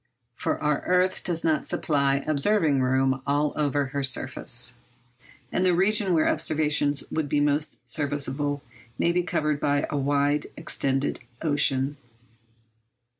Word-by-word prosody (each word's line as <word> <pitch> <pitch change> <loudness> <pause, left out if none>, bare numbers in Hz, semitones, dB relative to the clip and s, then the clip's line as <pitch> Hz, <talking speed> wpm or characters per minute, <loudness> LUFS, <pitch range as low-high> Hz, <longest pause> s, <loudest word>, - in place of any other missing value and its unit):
For - - -2
our 150 -1 0
earth 180 +1 +2
does 170 -3 -1
not 160 -2 +1
supply 140 -2 +1
observing 155 -1 +2
room 130 +1 +1
all 145 +1 +1
over 145 -1 0
her 140 +1 -3
surface, 125 -2 -1 0.8
and 185 - 0
the 180 -2 +3
region 195 0 +3
where 155 - +3
observation 150 -2 +1 0.2
would 155 -2 -2
be 145 - +1
most 145 +1 -1
serviceable 145 -1 -2 0.3
may 170 - +2
be 180 +1 +1
covered 155 -4 -1
by 145 0 +1
a 145 - -1
widely 145 +1 +1
extended 140 -4 -1 0.2
ocean. 145 -2 +1
145 Hz, 130 wpm, -25 LUFS, 140-160 Hz, 0.8 s, the